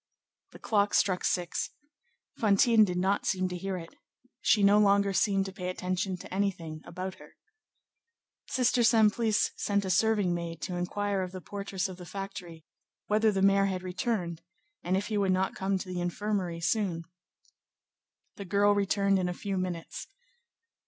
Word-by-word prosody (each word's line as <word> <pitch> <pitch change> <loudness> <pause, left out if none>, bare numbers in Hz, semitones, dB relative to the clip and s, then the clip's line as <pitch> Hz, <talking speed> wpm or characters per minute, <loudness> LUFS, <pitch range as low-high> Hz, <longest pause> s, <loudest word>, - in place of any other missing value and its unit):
The - - -13
clock 205 -2 +1
struck 185 -2 +2
six. 175 -2 -1 0.7
Fantine 220 +1 +5
did 180 -3 0
not 190 +3 0
seem 185 -2 +1
to 180 - -5
hear 190 +1 -3
it. 165 -1 -9 0.5
She 210 - +3
no 200 +1 +6
longer 200 -1 +3
seemed 195 0 +2
to 190 - -7
pay 180 -2 -4
attention 185 +1 -2
to 180 - -10
anything 175 -6 -2
about 185 +2 -6
her. - - -16 1.1
Sister 250 -1 +2
Simplice 220 -1 +3
sent 200 -1 0
a 190 - -1
serving 205 -2 +2
maid 170 -1 -4
to 180 - -3
inquire 195 +3 -1
of 185 -1 -4
the 185 - -5
portress 200 0 -4
of 185 -2 -9
the 180 - -10
factory, 180 -5 -7 0.4
whether 215 +1 +3
the 195 -1 0
mayor 195 0 +5
had 185 -2 -2
returned, 180 -3 -2 0.4
and 185 +2 0
if 200 - -2
he 215 -2 -1
would 195 -2 +2
not 190 +1 0
come 190 0 -1
to 185 - -7
the 180 -1 -3
infirmary 175 -1 -2
soon. 170 -2 0 1.3
The 200 - -6
girl 205 +2 +3
returned 200 -1 +2
in 180 -1 0
a 180 - -4
few 200 0 -4
minutes. 180 -3 -4
195 Hz, 165 wpm, -29 LUFS, 180-205 Hz, 1.3 s, no